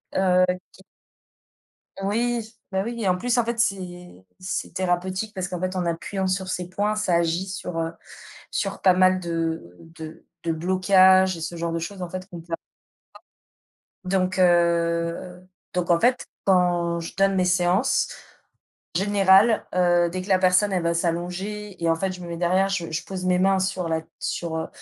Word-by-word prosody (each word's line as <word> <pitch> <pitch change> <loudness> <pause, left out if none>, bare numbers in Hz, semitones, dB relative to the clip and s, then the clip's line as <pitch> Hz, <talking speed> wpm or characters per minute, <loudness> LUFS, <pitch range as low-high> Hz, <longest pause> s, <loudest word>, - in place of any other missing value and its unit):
heu, 185 -1 +4 0.3
qui 190 - -18 1.2
Oui, 225 +2 -1 0.2
bah, 190 0 +1
oui 235 -1 -4
et 195 - +1
en 180 - +3
plus 245 +4 0
en 235 - +3
fait 235 0 -3
c'est 180 - -3
c'est 185 0 -4
thérapeutique 185 +3 -1
parce 185 0 -3
qu'en 180 -2 -4
fait 185 0 -2
en 180 -1 -1
appuyant 190 +3 -2
sur 185 0 -1
ces 180 -1 -3
points, 205 +3 -1
ça 205 -5 0
agit 170 +2 +1
sur, 180 -3 -5
heu, 165 0 -2 0.6
sur 195 -1 -3
pas 185 -1 +6
mal 185 0 +4
de 165 - -3
de 160 -1 -11 0.2
de 165 - 0
blocages 185 +2 +4
et 165 - -8
ce 170 +1 -5
genre 165 0 -2
de 165 - -1
choses 185 +3 -6
en 175 - -4
fait 185 +1 -6
qu'on 175 - -8
peut 165 0 -9
avoir. - - 0 1.5
Donc 185 0 0
heu, 170 0 +1 0.3
donc 180 -1 -1
en 170 - +5
fait, 250 +5 +2 0.2
quand 175 -2 +2
je 165 - -8
donne 195 0 +3
mes 180 -1 +2
séances, 180 +7 +2 0.9
en - - +2
général, 205 +2 +4
heu, 175 -1 +3
dès 185 +1 -4
que 195 - -11
la 185 - +5
personne 185 +2 +3
elle 180 -2 0
va 170 0 +1
s'allonger 180 +3 -3
et 165 - +3
en 165 - +2
fait, 190 +2 -2
je 180 -1 -9
me 170 - -7
mets 170 -1 -5
derrière, 185 +3 +2
je 170 -4 -2
je 165 +2 -3
pose 185 -1 -5
mes 180 0 +3
mains 190 +1 +3
sur 185 -3 -2
la 160 0 0 0.2
sur 165 -2 -3
heu 160 - -3
185 Hz, 190 wpm, -24 LUFS, 170-190 Hz, 1.5 s, pas